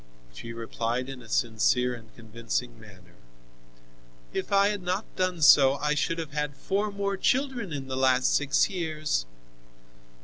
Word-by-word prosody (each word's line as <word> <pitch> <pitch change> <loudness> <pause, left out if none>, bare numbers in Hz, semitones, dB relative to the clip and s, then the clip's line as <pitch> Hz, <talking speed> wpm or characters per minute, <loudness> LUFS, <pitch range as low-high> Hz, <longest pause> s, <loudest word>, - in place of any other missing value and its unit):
She 90 - -8
replied 115 +2 -3
in 135 -2 -8
a 115 - -14
sincere 120 +3 +1
and 115 -2 -11
convincing 115 +1 -4
manner: 95 -5 -16 1.2
"If - - -4
I 200 0 +4
had 205 -2 -3
not 185 +4 -2
done 185 -3 -1
so, 135 -1 +7
I 150 +1 0
should 150 +3 -1
have 160 -3 -6
had 150 -1 -3
four 200 +6 -1
more 200 -1 -2
children 250 -3 0
in 140 -2 -5
the 130 - -4
last 130 -1 +3
six 145 -1 +2
years!" 155 - -2
140 Hz, 150 wpm, -27 LUFS, 115-180 Hz, 1.2 s, so